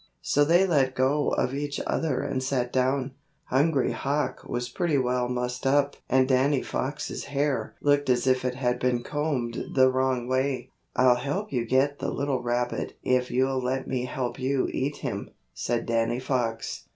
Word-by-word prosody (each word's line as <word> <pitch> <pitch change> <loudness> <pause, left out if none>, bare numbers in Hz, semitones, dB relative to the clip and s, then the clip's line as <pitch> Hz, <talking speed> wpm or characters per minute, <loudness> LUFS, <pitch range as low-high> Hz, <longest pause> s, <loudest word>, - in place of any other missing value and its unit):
So 145 - +3
they 170 +5 +4
let 135 -7 +2
go 140 +3 +2
of 125 +1 0
each 145 0 -3
other 155 -6 0
and 130 - -2
sat 130 -2 -1
down. 130 +1 +1 0.4
Hungry 140 0 +2
Hawk 140 -1 -2
was 120 0 -2
pretty 155 +4 0
well 125 -1 0
mussed 125 +1 -2
up 140 +1 +3
and 130 0 +4
Danny 135 +1 +2
Fox's 145 +3 -3
hair 145 0 -1
looked 145 -1 +2
as 125 0 +2
if 130 -1 +2
it 125 -1 -1
had 125 -1 0
been 125 -1 +1
combed 145 -6 -2
the 130 -1 +6
wrong 130 -2 0
way. 130 +1 -1 0.2
"I'll 125 -1 +5
help 145 +11 -3
you 120 -2 0
get 140 +3 +2
the - - -2
little 140 -2 -1
rabbit 120 0 -2
if 125 0 +1
you'll 130 +1 +1
let 130 +1 -1
me 125 -1 -1
help 125 0 -3
you 135 +1 +1
eat 140 +2 -1
him," - - -4 0.2
said 120 - -2
Danny 115 +1 0
Fox. 120 -4 -2
130 Hz, 175 wpm, -26 LUFS, 125-140 Hz, 0.4 s, the